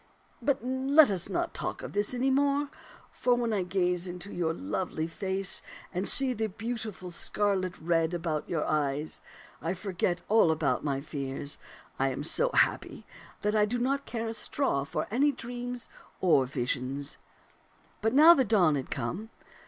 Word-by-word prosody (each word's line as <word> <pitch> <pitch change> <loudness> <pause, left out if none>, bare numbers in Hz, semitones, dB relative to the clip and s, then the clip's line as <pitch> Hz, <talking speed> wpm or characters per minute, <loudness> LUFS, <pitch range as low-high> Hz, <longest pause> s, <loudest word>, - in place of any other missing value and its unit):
But 275 -5 0
now 260 +2 -2
let 305 -8 +8
us 185 -4 +2
not 345 0 -1
talk - - -3
of - - -7
this 205 0 0
any 255 +2 +1
more, 280 +1 +2 0.4
for 245 -1 +2
when 235 -2 0
I 200 - +1
gaze 180 -1 +1
into 180 +2 -5
your 170 -2 0
lovely 180 - -3
face 190 +3 -1 0.3
and 185 +2 0
see 270 -2 +4
the 220 -1 -1
beautiful 220 -3 -5
scarlet 185 0 0
red 165 +1 +1
about 160 -3 -3
your 160 -3 -1
eyes, 150 0 -1 0.4
I 170 +3 -2
forget 180 -2 -2
all 220 -5 +5
about 160 -1 +1
my 140 -2 -1
fears; 140 -1 -5 0.4
I 135 0 +2
am 130 - -4
so 480 - +4
happy - - +1 0.4
that 210 +1 +1
I 210 -1 +4
do 245 +3 -1
not 275 +3 -1
care 230 -1 -3
a - - -3
straw 220 - -1
for - - -2
any 280 +6 +3
dreams 245 -1 -6 0.3
or 145 -8 +4
visions." 135 +2 -3 0.8
But 225 +3 +1
now 315 +4 +10
the 275 -6 +3
dawn 195 -9 +4
had 135 -2 -3
come. 215 +5 -4
195 Hz, 170 wpm, -29 LUFS, 160-245 Hz, 0.8 s, now